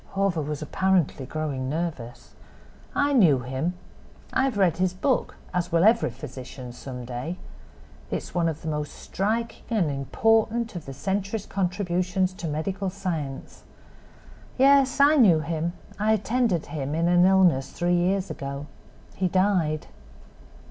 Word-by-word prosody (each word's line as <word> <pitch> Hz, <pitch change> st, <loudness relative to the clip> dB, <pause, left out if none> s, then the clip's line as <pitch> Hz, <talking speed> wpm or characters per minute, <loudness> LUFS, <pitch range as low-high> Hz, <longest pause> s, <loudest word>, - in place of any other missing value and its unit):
Hawver 195 Hz, -4 st, +1 dB
was 150 Hz, 0 st, -4 dB
apparently 175 Hz, -5 st, +1 dB
growing 140 Hz, -4 st, -3 dB
nervous. 150 Hz, -6 st, -5 dB, 0.6 s
"I 285 Hz, 0 st, +2 dB
knew 165 Hz, -, +5 dB
him. 130 Hz, +8 st, -2 dB, 0.6 s
I 265 Hz, -, +3 dB
have 260 Hz, -6 st, -1 dB
read 185 Hz, -5 st, +3 dB
his 185 Hz, 0 st, 0 dB
book, 260 Hz, +7 st, 0 dB, 0.2 s
as 180 Hz, -1 st, -1 dB
will 165 Hz, +1 st, +3 dB
every 225 Hz, -, +4 dB
physician 125 Hz, +1 st, -9 dB
some 125 Hz, 0 st, -8 dB
day. 125 Hz, +9 st, -5 dB, 0.7 s
It -, -, -1 dB
is -, -, -6 dB
one 170 Hz, -2 st, +2 dB
of 160 Hz, -1 st, -6 dB
the -, -, -5 dB
most 150 Hz, -1 st, -3 dB
striking 225 Hz, +4 st, -2 dB
and 200 Hz, -10 st, +1 dB
important 225 Hz, -, +1 dB
of 170 Hz, -4 st, -7 dB
the 135 Hz, -, -6 dB
century's 195 Hz, -, -2 dB
contributions 185 Hz, -1 st, -1 dB
to 180 Hz, -2 st, -6 dB
medical 185 Hz, +6 st, -2 dB
science. 165 Hz, -8 st, -5 dB, 1.0 s
Yes, 275 Hz, 0 st, +5 dB
I 290 Hz, +2 st, +6 dB
knew 185 Hz, -, +6 dB
him; 165 Hz, +1 st, -2 dB, 0.3 s
I 215 Hz, +1 st, +3 dB
attended 220 Hz, -4 st, +1 dB
him 145 Hz, -1 st, -4 dB
in 165 Hz, +1 st, +1 dB
an 175 Hz, 0 st, +5 dB
illness 180 Hz, -8 st, +4 dB
three 175 Hz, 0 st, 0 dB
years 185 Hz, +1 st, +1 dB
ago. 140 Hz, -1 st, -5 dB, 0.5 s
He 190 Hz, -, +1 dB
died." 180 Hz, -5 st, +1 dB
175 Hz, 145 wpm, -25 LUFS, 150-200 Hz, 1.0 s, I